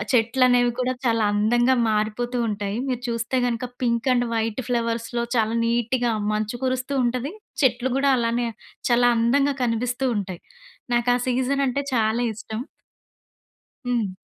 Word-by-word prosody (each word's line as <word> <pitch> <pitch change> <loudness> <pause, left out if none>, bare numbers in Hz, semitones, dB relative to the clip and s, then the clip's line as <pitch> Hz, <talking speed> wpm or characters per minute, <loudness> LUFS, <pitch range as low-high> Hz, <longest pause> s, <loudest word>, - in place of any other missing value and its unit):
ఆ - - -3
చెట్లనేవి 245 +1 +4
కూడా 255 0 +1
చాలా 230 -2 +2
అందంగా 240 +5 +3 0.2
మారిపోతూ 220 +3 -1
ఉంటాయి. 205 -1 -3
మీరు 250 -2 -1
చూస్తే 230 +2 -1
గనక 245 +1 -2 0.2
పింక్ 235 0 +1
అండ్ 245 -1 +2
వైట్ 225 +1 -1
ఫ్లవర్స్‌లో 235 0 -1
చాలా 220 0 +1
నీట్‌గా 235 +1 +1 0.2
మంచు 215 +2 -2
కురుస్తూ 260 +2 -1
ఉంటది. 250 +5 -1 0.3
చెట్లు 255 0 +2
గూడా 275 0 +3
అలానే 235 0 0 0.4
చాలా 245 0 +5
అందంగా 275 +5 +2
కనిపిస్తూ 245 +3 -1
ఉంటాయి. 190 -3 -4 0.5
నాకా 240 +1 +3
సీజన్ 260 +2 +1
అంటే 280 +3 -1
చాలా 225 0 +1
ఇష్టం. 220 +1 -6 1.3
హ్మ్. 225 -6 0
240 Hz, 135 wpm, -23 LUFS, 225-250 Hz, 1.3 s, చాలా